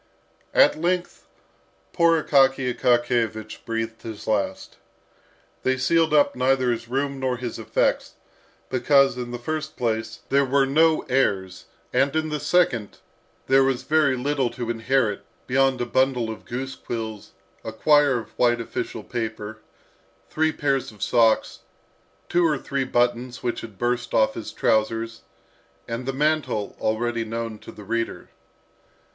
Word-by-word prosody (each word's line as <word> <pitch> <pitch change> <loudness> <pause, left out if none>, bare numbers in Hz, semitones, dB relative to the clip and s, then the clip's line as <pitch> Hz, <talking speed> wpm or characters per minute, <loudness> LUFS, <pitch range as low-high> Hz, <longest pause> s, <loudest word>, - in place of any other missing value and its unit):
At 155 - +5
length 180 +1 -2 0.7
poor 165 -2 +3
Akaky 135 -2 +3
Akakiyevich 120 -3 0
breathed 115 0 -3
his 110 -2 -8
last. 100 -3 -2 0.8
They 130 0 +1
sealed 165 +4 +2
up 150 -1 +4
neither 130 0 +2
his 115 0 -4
room 135 +2 -2
nor 130 -1 -1
his 120 -1 -5
effects, - - 0 0.6
because, 135 +2 +4
in 125 -1 -5
the 120 - -4
first 155 +5 -4
place, 110 -1 -2
there 140 +1 +4
were 135 +1 +2
no 160 +3 +3
heirs, 100 -8 0 0.3
and, 140 +2 +2
in 155 0 0
the 150 -1 -2
second, 125 - +1 0.5
there 135 0 +5
was 135 -2 0
very 150 -4 +2
little 135 0 0
to 120 0 -4
inherit 115 -2 0 0.2
beyond 135 0 +2
a - - 0
bundle 125 -2 +1
of 110 - -10
goose 130 +2 -4
quills, 110 -4 -6 0.3
a 110 - -5
quire 145 +3 +4
of 115 - -7
white 120 -1 +3
official 115 - -5
paper, 110 -2 -5 0.7
three 160 0 +2
pairs 140 -5 -1
of 105 -2 -7
socks, 115 -2 +2 0.7
two 175 0 +2
or 155 -4 +2
three 135 0 -2
buttons 120 0 0
which 120 -1 -2
had 110 -4 -10
burst 120 +2 -1
off 110 -1 +3
his 115 - -6
trousers, 115 +1 0 0.7
and 120 +2 -5
the - - +1
mantle 145 -7 -1
already 115 +1 0
known 115 -1 -5
to - - -11
the 105 - -12
reader. 115 +3 -3
125 Hz, 145 wpm, -24 LUFS, 115-135 Hz, 0.8 s, At